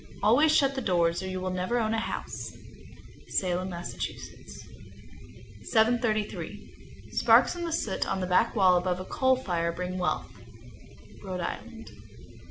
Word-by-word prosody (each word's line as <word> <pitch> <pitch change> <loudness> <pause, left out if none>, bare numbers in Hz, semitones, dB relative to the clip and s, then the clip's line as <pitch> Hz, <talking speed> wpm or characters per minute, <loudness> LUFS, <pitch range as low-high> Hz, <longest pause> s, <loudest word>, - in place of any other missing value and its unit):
Always 265 +9 +5
shut 275 -3 +3
the 265 - -3
doors, 170 -5 +1
or 190 - -5
you 185 0 -3
will 185 0 -3
never 185 +6 -1
own 220 -2 0
a 225 - +1
house. - - -5 0.7
Salem, 185 0 -1
Mass. 175 -1 -6 1.7
733. 220 -2 -1
Sparks - - +5
in 345 - -5
the 335 - -3
soot 225 -11 -1
on 195 - -1
the 185 - -1
back 185 +7 +2
wall 185 -4 +5
above 180 0 -1
a 185 - -6
coal 260 +2 +2
fire 175 -9 -1
bring 180 +2 -4
wealth. 180 - -1 1.0
_Rhode 185 -2 -4
Island. 225 +6 -6
190 Hz, 145 wpm, -28 LUFS, 180-235 Hz, 1.7 s, Always